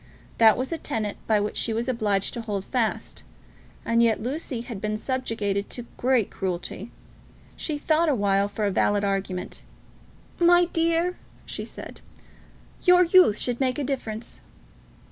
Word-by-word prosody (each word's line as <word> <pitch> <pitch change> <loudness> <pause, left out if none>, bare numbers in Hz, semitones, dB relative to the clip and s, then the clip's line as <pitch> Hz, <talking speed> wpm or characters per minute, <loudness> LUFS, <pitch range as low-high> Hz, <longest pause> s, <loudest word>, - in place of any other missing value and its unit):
That 220 -2 +7
was 255 +4 -3
a 330 - -2
tenet 220 -9 -3
by 215 -2 +3
which 205 +1 -2
she 225 - 0
was 230 +2 -2
obliged 210 -6 0
to 235 - -4
hold 205 -4 -4
fast. 235 -4 -2 0.6
And 230 0 +3
yet 230 -2 +3
Lucy 255 0 -3
had 235 -5 -7
been 215 0 -1
subjected 215 -5 -2
to 245 - -6
great 250 -4 +1
cruelty. 185 +3 -4 0.7
She 305 -2 -3
thought 315 +2 +2
awhile 200 -6 +2
for 210 +1 -3
a 200 - +1
valid 205 +2 +2
argument. 195 -1 -2 0.8
"My 350 0 +6
dear," 335 +1 0 0.3
she - - -6
said, - - -9 0.8
"your 360 -1 +6
youth 350 - +5
should 245 -1 -2
make 260 -2 +1
a 295 - -1
difference." 235 -4 -5
230 Hz, 150 wpm, -25 LUFS, 205-280 Hz, 0.8 s, That